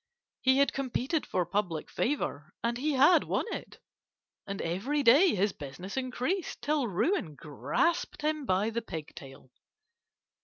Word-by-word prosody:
He 260 0 +4
had 280 0 +3
competed 270 +3 -1
for 180 - 0
public 175 -4 -2
favour, 175 - -2
and 235 0 0
he 300 +3 0
had 280 +6 +6
won - - -1
it, - - -7 0.7
and 195 0 -4
every 225 - -1
day 285 - +6
his 200 +2 +2
business 150 +7 -8
increased 260 +8 -2
till 295 -4 +1
ruin 205 - 0
grasped 330 - -1
him 305 -3 -1
by 195 +4 +1
the 235 +1 -2
pigtail. 150 - -9
235 Hz, 140 wpm, -30 LUFS, 180-290 Hz, 0.7 s, had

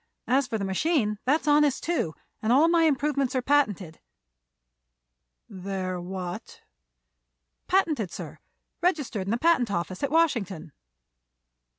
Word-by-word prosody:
As 260 +1 +2
for 225 - -2
the 200 - -3
machine, 210 - 0
that's 300 +4 +1
honest, 295 -2 +3
too, 305 - -1 0.3
and 220 - 0
all 285 +6 +5
my 335 -1 +4
improvements 280 -3 0
are 255 - +1
patented." 205 - 0 1.5
"They're 185 -1 -4
what?" 180 0 -7 1.0
"Patented, 310 - +1
sir; - - -8 0.4
registered 290 - -1
in - - -2
the 230 - +1
patent 295 -5 +2
office 185 0 -3
at 280 - 0
Washington." 215 - 0
250 Hz, 120 wpm, -26 LUFS, 190-300 Hz, 1.5 s, all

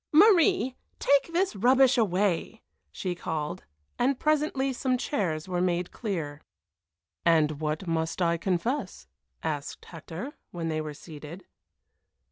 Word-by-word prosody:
"Marie, 365 - +5 0.2
take 280 +4 +3
this 360 - +1
rubbish 255 +5 +5
away!" 205 -1 +1 0.3
she 185 -2 -3
called, 160 0 -4 0.3
and 255 +2 +2
presently 295 -3 +1
some 255 0 0
chairs 190 - -1
were 180 -1 -1
made 180 -1 0
clear. 160 -10 -4 0.8
"And 155 -2 +3
what 155 +4 -2
must 165 0 -1
I 170 -1 +2
confess?" 190 - -2 0.4
asked 150 -3 -4
Hector, 170 - -7 0.2
when 165 -2 -4
they 155 -1 -1
were 155 -1 -6
seated. 160 +3 -10
185 Hz, 120 wpm, -28 LUFS, 160-260 Hz, 0.8 s, Marie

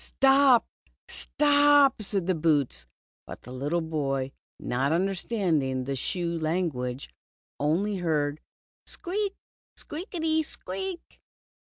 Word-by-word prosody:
''Stop, 270 -2 +5 0.4
siop,^' 290 -4 +4
said 195 -3 -1
the 185 - +2
boots, 145 - 0 0.4
but - - -9
the 125 - -10
little 145 +7 -1
boy, 135 -4 -2 0.3
not 130 +4 -1
understanding 175 - 0
the 135 +1 -3
shoe 170 +4 -2
language 155 -6 -2 0.5
only 185 +8 +1
heard 155 -4 -1 0.2
" - - -83
squeak, 400 +2 -3 0.4
squeak 330 +6 -7
i - - -1
ty 320 -1 +2
squeak." 375 +3 -6
170 Hz, 110 wpm, -27 LUFS, -, 0.5 s, Stop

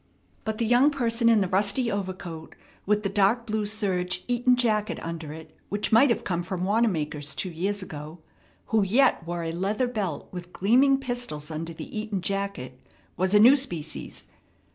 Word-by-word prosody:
But 220 -1 -2
the 230 - 0
young 245 +5 +5
person 235 -4 +1
in 225 -2 +5
the 190 - +1
rusty 205 +6 +2
overcoat, 185 -5 -5 0.3
with 210 +1 +2
the - - +1
dark 205 +4 +2
blue 215 -1 -1
serge 185 -4 -1
Eton 245 +1 +3
jacket 215 -4 0
under 165 -2 -5
it, 160 +1 -11
which 205 +1 -1
might 235 +5 +6
have 235 - 0
come 175 -2 -1
from 180 0 -4
Wanamaker's 165 -9 0
two 185 - -3
years 195 +4 -2
ago, 155 -1 -8 0.6
who 220 - +5
yet 225 +1 +3
wore 175 0 -3
a 165 - -2
leather 195 +8 -1
belt 200 -11 -3
with 180 -1 -8
gleaming 260 +8 +4
pistols 245 - -4
under 165 +2 -4
the 160 - -9
Eton 215 -3 -3
jacket, 195 -11 -3 0.4
was 185 +3 +1
a - - +7
new 245 +6 +8
species. 170 - -5
200 Hz, 175 wpm, -26 LUFS, 175-230 Hz, 0.6 s, new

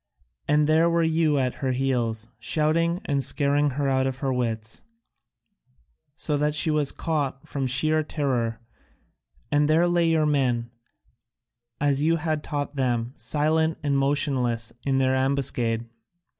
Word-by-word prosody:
And 150 0 +3
there 160 +2 +4
were 170 0 +2
you 160 -2 +2
at 130 -2 0
her 130 -2 0
heels, 120 -4 -1
shouting 165 +7 +1
and 140 -1 0
scaring 145 +1 +1
her 145 -1 0
out 130 0 +1
of 130 -1 -3
her 135 0 -1
wits, 115 -3 -3 1.3
so 150 -1 -1
that 150 +1 0
she 155 +1 +1
was 150 -2 +1
caught 140 -4 -3
from 135 -2 -2
sheer 155 +5 +2
terror, 125 -7 -2 0.9
and 150 0 +3
there 165 +3 +4
lay 175 -1 +2
your 160 -1 +2
men, 125 -5 0 1.1
as 140 -1 +1
you 165 +2 +3
had 155 -2 -2
taught 145 -1 -4
them, 120 -2 -1
silent 155 +6 +1
and 145 -1 +1
motionless 130 -5 0
in 135 -1 +2
their 130 0 +2
ambuscade. 125 -4 -1
140 Hz, 145 wpm, -25 LUFS, 130-155 Hz, 1.3 s, there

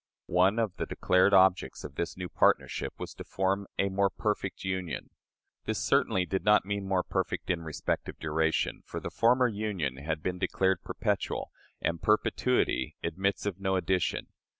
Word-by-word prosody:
One 95 +5 +3
of 110 -5 -1
the - - -3
declared 90 +2 +3
objects 95 -7 +4
of 70 - -7
this 85 +5 -3
new 90 -1 -4
partnership - - +1
was - - -6
to - - -8
form 95 +1 -1
"a 100 - +2
more 100 +1 +2
perfect 105 -2 -2
union." 95 -2 -3 0.5
This - - -1
certainly 90 -1 +2
did 95 +1 -2
not 105 -2 +5
mean 100 -1 -3
more 95 -2 +1
perfect - - -2
in 85 -2 -1
respect 80 -2 -3
of - - -8
duration; 80 +1 0
for - - -4
the - - -6
former 125 +2 +4
union 100 - -2
had 80 +2 -3
been 90 0 -2
declared 95 -2 +1
perpetual, - - -2 0.3
and 85 -1 -1
perpetuity 105 - +1
admits 100 +5 -1
of 100 -2 -2
no 95 -1 0
addition. 95 -1 0
95 Hz, 170 wpm, -29 LUFS, 85-100 Hz, 0.5 s, not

